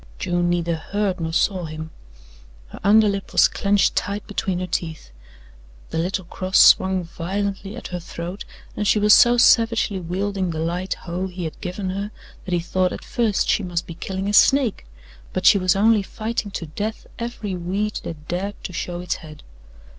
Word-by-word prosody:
June 175 - 0
neither 170 -1 0
heard 195 +2 -2
nor 160 -1 -2
saw 180 +1 +1
him. 155 0 -7 0.8
Her - - -10
underlip 205 -1 +3
was - - +6
clenched 200 0 +1
tight 200 +1 -2
between 195 -3 -2
her 185 - -2
teeth, 160 - -4 0.8
the - - -1
little 185 +2 -2
cross 185 +2 -1
swung 190 -1 +6
violently 195 +4 -4
at 240 - -8
her 180 - -4
throat 175 +3 -7 0.3
and 210 - -1
she - - +4
was 210 0 +6
so 240 0 +7
savagely 230 -5 +4
wielding 190 +2 -2
the 160 - -4
light 175 +3 -2
hoe 180 +2 -3
he 180 -1 -7
had 160 - -6
given 185 0 -3
her 200 +2 -3 0.4
that 185 - -3
he - - +1
thought 185 +2 0
at - - -7
first 225 -4 0
she - - +2
must 175 -3 -3
be 170 - -8
killing 190 +3 -4
a 205 - -1
snake; 250 - +4 0.5
but - - -2
she 200 - +7
was 185 0 +2
only 215 +1 +4
fighting 215 +2 -4
to 185 -3 -5
death 210 +8 -5
every 230 -4 -4
weed 195 +5 -2
that 155 -2 -8
dared 195 +4 -3
to 180 - -6
show 175 +1 -4
its 180 - -2
head. 155 -2 -12
190 Hz, 185 wpm, -22 LUFS, 175-205 Hz, 0.8 s, so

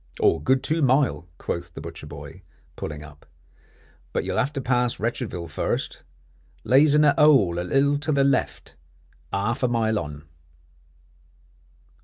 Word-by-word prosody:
"Good 130 0 +2
two 160 +3 0
mile," 130 - +2
quoth 85 -1 -5
the - - -6
butcher 75 - -9
boy, 75 +4 -10 0.3
pulling 75 -1 -6
up. 75 -1 -15 0.9
"But - - 0
you'll - - -1
have 140 - 0
to 140 - -3
pass 125 -1 0
Wretchedville 110 -6 -3
first. 80 - -3 0.6
Lays 145 +3 +5
in 150 - +5
a 145 -1 +5
'ole 130 - +5
a - - -1
little 140 +10 +2
to 150 +2 -1
the 140 -2 +3
left, 140 0 -1 0.6
'arf 115 +6 -1
a 125 - +3
mile 110 -3 +1
on." 75 -3 -7
120 Hz, 145 wpm, -24 LUFS, 85-140 Hz, 0.9 s, Lays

